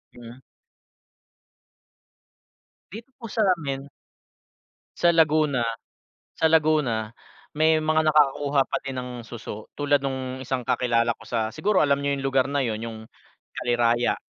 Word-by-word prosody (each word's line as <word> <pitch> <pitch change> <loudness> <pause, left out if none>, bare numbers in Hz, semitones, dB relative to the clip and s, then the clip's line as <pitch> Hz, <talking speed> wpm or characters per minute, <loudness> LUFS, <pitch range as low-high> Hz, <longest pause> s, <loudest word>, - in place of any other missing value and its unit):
Mm. 120 +2 -12 2.5
Dito 225 +5 -10
po 235 - -9
sa 225 - 0
amin. 140 -3 -5 1.1
Sa 175 - +4
Laguna 155 -6 +2 0.7
sa 160 - +4
Laguna 150 -9 +2 0.4
may 155 +1 +3
mga 155 0 +2
nakakakuha 145 -2 +3
pa - - -3
din 135 -1 -4
ng 125 - -7 0.2
suso, 110 -2 -8
tulad 145 -1 +2
nung 130 -1 -3
isang 130 0 -3
kakilala 120 -2 +1
ko - - -16
sa, 110 -2 -1
siguro 195 - +1
alam 140 -1 +3
niyo 140 0 0
yung 135 - -6
lugar 135 -1 +2
na 140 0 0
yun 110 -3 -2
yung 110 -1 -7 0.5
Kaliraya. 120 0 +1
135 Hz, 130 wpm, -24 LUFS, 120-155 Hz, 2.5 s, Sa